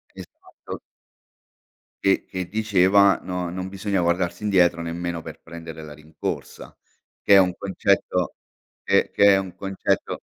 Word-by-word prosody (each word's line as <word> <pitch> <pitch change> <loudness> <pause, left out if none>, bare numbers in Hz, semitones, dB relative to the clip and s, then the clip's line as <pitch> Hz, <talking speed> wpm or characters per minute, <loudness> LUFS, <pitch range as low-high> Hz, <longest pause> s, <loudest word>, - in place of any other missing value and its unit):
Esatto. - - -11 1.3
Che 95 - +3
che 90 -1 -5
diceva: 100 -2 +4
"No 90 -1 -3
non 95 +1 -5
bisogna 95 -1 -1
guardarsi 85 +3 -1
indietro, 90 -4 +3
nemmeno 85 0 -4
per 80 0 -10
prendere 80 -1 -9
la 75 -1 -9
rincorsa." 75 +2 -7 0.4
Che 100 - +4
è - - +9
un 90 -2 +4
concetto 95 -2 0 0.5
che - - +2
che 100 -1 +5
è - - +4
un 95 -2 -4
concetto 95 -1 -2
90 Hz, 135 wpm, -23 LUFS, 85-95 Hz, 1.3 s, è